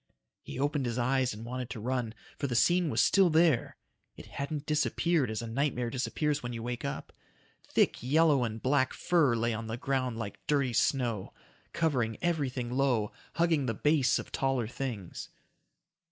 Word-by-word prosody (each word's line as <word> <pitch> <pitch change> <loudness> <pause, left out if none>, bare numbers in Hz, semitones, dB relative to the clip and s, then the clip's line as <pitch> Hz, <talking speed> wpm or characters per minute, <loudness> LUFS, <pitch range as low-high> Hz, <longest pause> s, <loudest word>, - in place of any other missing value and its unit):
He - - -8
opened 145 -1 0
his 120 0 -2
eyes 130 +1 +1
and 110 +2 -8
wanted 125 0 -5
to 115 - -6
run, 120 0 -2 0.2
for 140 - -1
the 125 - -2
scene 175 +6 +3
was 115 -4 +3
still 195 -3 +5
there. 160 -5 +3 0.4
It - - -11
hadn't 140 +1 -5
disappeared 155 -1 +1
as 110 +1 -3
a - - -5
nightmare 125 -1 -1
disappears 145 +3 -1
when 120 0 -5
you 115 -1 -5
wake 120 0 -4
up. - - -5 0.5
Thick - - +2
yellow 145 +1 +3
and 110 -1 -3
black 130 +2 +2
fur 160 -9 +3
lay 115 0 0
on 110 0 -4
the 110 +1 -4
ground 130 -3 -1
like 110 -3 -5
dirty 140 -4 +1
snow. 115 -5 0 0.4
Covering 130 -10 0
everything 135 -8 -1
low, 125 -5 +1 0.2
hugging 165 -5 +2
the 115 - -1
base 145 -2 +3
of - - -7
taller 135 -4 0
things. 115 -7 -5
130 Hz, 170 wpm, -30 LUFS, 115-145 Hz, 0.5 s, still